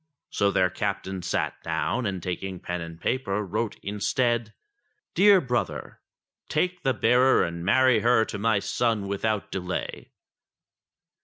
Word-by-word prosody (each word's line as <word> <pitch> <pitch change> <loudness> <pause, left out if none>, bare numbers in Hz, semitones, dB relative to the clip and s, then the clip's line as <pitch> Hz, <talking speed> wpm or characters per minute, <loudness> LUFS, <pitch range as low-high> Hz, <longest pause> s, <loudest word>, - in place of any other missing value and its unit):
So 100 - +2
their 90 -2 +2
captain 95 -1 -3
sat - - -2
down, 125 -3 -1
and 95 -3 -4
taking 90 +1 -4
pen 90 0 -4
and 85 0 -8
paper 105 -1 -1
wrote 105 +3 -2
instead: 110 +3 0 0.6
"Dear 195 +2 +6
Brother, 125 -6 -3 0.5
Take 180 +4 0
the 130 -2 +1
bearer 125 +4 +4
and 85 0 -4
marry 130 +4 +4
her 115 0 +3
to 105 - -6
my 110 0 +2
son 110 0 -1
without 100 +1 -2
delay." 90 -1 -4
105 Hz, 135 wpm, -26 LUFS, 95-125 Hz, 0.6 s, Dear